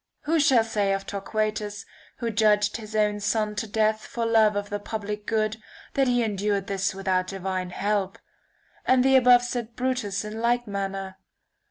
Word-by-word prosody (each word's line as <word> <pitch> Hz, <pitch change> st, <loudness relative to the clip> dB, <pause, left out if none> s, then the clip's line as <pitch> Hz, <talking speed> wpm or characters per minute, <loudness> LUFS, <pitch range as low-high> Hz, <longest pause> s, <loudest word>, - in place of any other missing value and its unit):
Who 320 Hz, +2 st, +1 dB
shall 265 Hz, -6 st, +5 dB
say 205 Hz, -3 st, 0 dB
of 195 Hz, 0 st, -3 dB
Torquatus, 210 Hz, +1 st, -3 dB, 0.3 s
who 235 Hz, -1 st, -2 dB
judged 210 Hz, -1 st, +3 dB
his 220 Hz, -1 st, -9 dB
own 210 Hz, -1 st, +2 dB
son 210 Hz, 0 st, 0 dB
to 225 Hz, -, -2 dB
death 215 Hz, +1 st, +1 dB
for 235 Hz, -1 st, -3 dB
love 220 Hz, -2 st, +4 dB
of 205 Hz, 0 st, -3 dB
the 205 Hz, -, -2 dB
public 210 Hz, 0 st, -5 dB
good, 215 Hz, -1 st, 0 dB, 0.4 s
that 270 Hz, -1 st, +2 dB
he 245 Hz, -1 st, +2 dB
endured 205 Hz, -2 st, -1 dB
this 195 Hz, -1 st, -1 dB
without 185 Hz, -1 st, 0 dB
divine 185 Hz, -1 st, -3 dB
help? 195 Hz, 0 st, -1 dB, 0.7 s
And 255 Hz, 0 st, +3 dB
the 265 Hz, 0 st, +5 dB
above 250 Hz, -1 st, +6 dB
said 240 Hz, -2 st, -4 dB
Brutus, 245 Hz, -6 st, -2 dB
in 215 Hz, +1 st, -6 dB
like 240 Hz, +1 st, +1 dB
manner 195 Hz, -2 st, -4 dB
210 Hz, 170 wpm, -25 LUFS, 200-230 Hz, 0.7 s, above